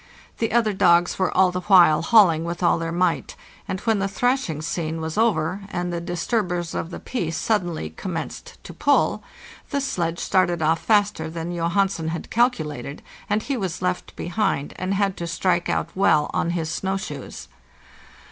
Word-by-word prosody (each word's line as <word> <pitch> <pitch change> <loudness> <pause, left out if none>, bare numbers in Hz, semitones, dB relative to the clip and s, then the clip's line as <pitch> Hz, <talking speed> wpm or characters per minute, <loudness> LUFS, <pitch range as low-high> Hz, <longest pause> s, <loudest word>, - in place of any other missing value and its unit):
The 225 - 0
other 225 -3 +2
dogs 175 -1 +3
were 185 - +1
all 185 -1 +5
the 180 0 -3
while 175 -5 +6
hauling 170 -5 +5
with 170 +1 -4
all 170 - +3
their 165 0 -3
might, 175 0 0 0.3
and 190 - -3
when 225 -3 +1
the 195 - 0
thrashing 245 - 0
scene 165 -1 -3
was 160 0 -4
over, 195 -4 +1
and 175 -1 -3
the 170 - -3
disturbers 175 0 -2
of 165 - -3
the - - -7
peace 170 -10 -3
suddenly 175 - -1
commenced 165 - -6
to - - -9
pull, - - +2 0.5
the 280 - 0
sledge 170 -11 -2
started 175 -2 +1
off 160 +1 +2
faster 205 -7 +1
than 165 +1 -5
Johansen 170 0 0
had 165 +1 -5
calculated, 155 - -1 0.3
and 210 +2 +1
he 280 - -2
was 185 -6 -3
left 180 0 -2
behind 175 -5 -1
and 185 +2 -1
had 195 -1 +1
to 170 - -4
strike 175 0 0
out - - 0
well 170 -6 +3
on 170 - 0
his 165 -2 -2
snow 190 +4 -1
shoes. 140 - -7
175 Hz, 175 wpm, -23 LUFS, 165-195 Hz, 0.5 s, while